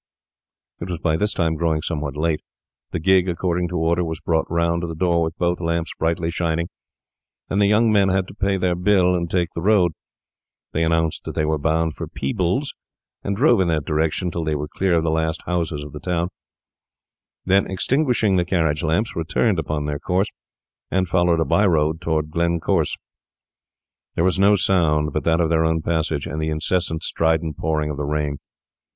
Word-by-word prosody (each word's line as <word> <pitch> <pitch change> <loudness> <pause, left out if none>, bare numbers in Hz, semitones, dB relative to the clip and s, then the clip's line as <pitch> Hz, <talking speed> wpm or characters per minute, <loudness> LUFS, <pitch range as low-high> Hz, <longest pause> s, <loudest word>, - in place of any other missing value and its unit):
It 90 - -6
was 90 - -2
by 80 -1 0
this 105 +6 0
time 80 -2 0
growing 80 -1 0
somewhat 75 -4 -3
late. 80 0 0 0.5
The - - -3
gig, 95 +2 +3
according 90 0 -1
to 90 0 -3
order, 85 +2 +1
was 80 -1 -4
brought 80 -1 0
round 85 0 +1
to 85 - -3
the 80 - -5
door 85 0 +1
with 80 +1 -2
both 90 0 0
lamps 85 -1 -1
brightly 85 +1 0
shining, 85 0 -1 0.8
and 100 - +2
the 100 - +5
young 110 +2 +4
men 100 -2 +4
had 95 0 +1
to - - -10
pay 100 -1 0
their 90 -1 +1
bill 90 0 +3
and 85 -1 -1
take 90 -2 0
the 85 - -4
road. 95 -3 +3 0.8
They 80 - 0
announced 80 -1 0
that - - -6
they 80 - +1
were 80 0 0
bound 80 +1 +1
for - - -6
Peebles, 90 - -1 0.5
and 100 - -1
drove 120 -5 +4
in 90 - +1
that 80 -3 0
direction 80 +3 0
till 85 - -3
they 80 -1 -1
were 75 +1 -3
clear 90 +3 0
of 80 - +2
the 80 - +1
last 80 0 -1
houses 85 -4 -2
of 75 - -9
the 75 - -6
town; 90 +2 -1 1.2
then, 95 +1 +3
extinguishing 115 - +1
the 85 -3 +1
lamps, 85 +8 0
returned 90 +4 +1
upon 75 -1 -2
their 75 -1 -3
course, 95 +5 0 0.6
and 95 -1 0
followed 85 -2 +2
a 80 - +2
by 105 - +2
road 80 -1 +1
toward 80 -2 -1
Glencorse. 85 0 0 1.2
There 85 - +1
was 95 +1 +2
no 100 +1 +5
sound 80 -6 +2
but 75 - -1
that 80 0 +3
of 85 -2 +2
their 80 -1 +3
own 80 0 0
passage, 80 -4 -1
and 75 +3 -4
the 80 - -1
incessant, 80 +1 -1
strident 80 -2 0
pouring 75 -1 -1
of 70 - -6
the 75 - -3
rain. 75 -1 -1
85 Hz, 195 wpm, -22 LUFS, 80-90 Hz, 1.2 s, the